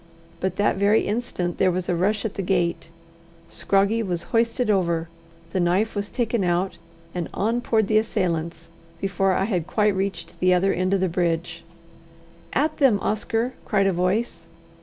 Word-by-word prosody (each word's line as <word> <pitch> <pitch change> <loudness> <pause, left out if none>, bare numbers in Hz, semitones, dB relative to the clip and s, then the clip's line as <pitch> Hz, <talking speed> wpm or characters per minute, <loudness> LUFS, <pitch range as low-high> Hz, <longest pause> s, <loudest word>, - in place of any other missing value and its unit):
But 185 -1 -1
that 205 -1 +1
very 200 +2 +3
instant 205 -6 -2
there 185 - +4
was 180 0 -2
a 180 - +1
rush 200 +5 0
at 215 - -2
the 200 - -3
gate; 175 -3 0 0.6
Scroggie 200 +3 +1
was 180 -5 -2
hoisted 230 +1 +2
over, 170 -5 +1 0.4
the 185 - -1
knife 185 +6 +1
was 205 0 -2
taken 235 -4 -1
out, 175 0 0 0.3
and 175 -2 -3
on 230 +4 0
poured 220 -3 +1
the 215 +1 +4
assailants, 175 -6 -2 0.3
before 195 0 +1
I 190 - +1
had 180 -6 -1
quite 210 -1 +2
reached 190 -3 -4
the 185 0 +4
other 195 +2 +2
end 185 +2 +1
of 190 - 0
the 190 - +2
bridge. 170 -1 -1 0.9
"At 300 +4 0
them, 265 -8 +4
Oscar!" 225 +4 -1
cried 195 -2 +1
a 195 - +2
voice. 180 0 -1
195 Hz, 170 wpm, -24 LUFS, 175-215 Hz, 0.9 s, there